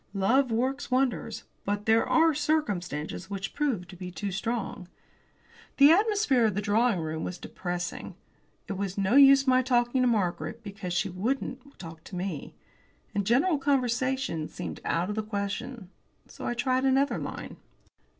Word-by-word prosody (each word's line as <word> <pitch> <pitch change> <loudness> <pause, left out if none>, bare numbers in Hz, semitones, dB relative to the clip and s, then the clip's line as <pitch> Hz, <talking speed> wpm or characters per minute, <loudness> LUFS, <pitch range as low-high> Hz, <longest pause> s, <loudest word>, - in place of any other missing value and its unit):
Love 245 +7 +3
works 260 +5 -1
wonders. 250 -4 0 0.2
But 205 +1 -2
there 225 0 +4
are 325 0 +4
circumstances 205 - -2
which 195 -1 -4
prove 265 -12 -1
too 185 +2 -6
strong. 210 -2 -3 0.9
The 280 +2 +8
atmosphere 400 - +3
of 210 - -2
the - - 0
drawing 220 0 +2
room 160 0 -3
was 180 - -4
depressing. 175 -1 -5 0.5
It - - -3
was 195 -1 -3
no 195 +4 +1
use 275 -1 +8
my 255 -1 +4
talking 245 0 +1
to 250 - +3
Margaret, 220 +1 -1
because 195 -3 -6
she 195 +3 0
wouldn't 260 +7 -3
talk 165 -2 -10
to 190 - -9
me. 180 -4 -5 0.6
And 200 -1 -1
general 285 +7 +3
conversation 255 - 0
seemed - - -6
out 170 +3 0
of - - -4
the 220 - 0
question. 205 +1 -5 0.4
So - - -8
I 240 - -1
tried 255 +1 +1
another 270 +1 +2
line. - - -6
225 Hz, 150 wpm, -28 LUFS, 190-265 Hz, 0.9 s, The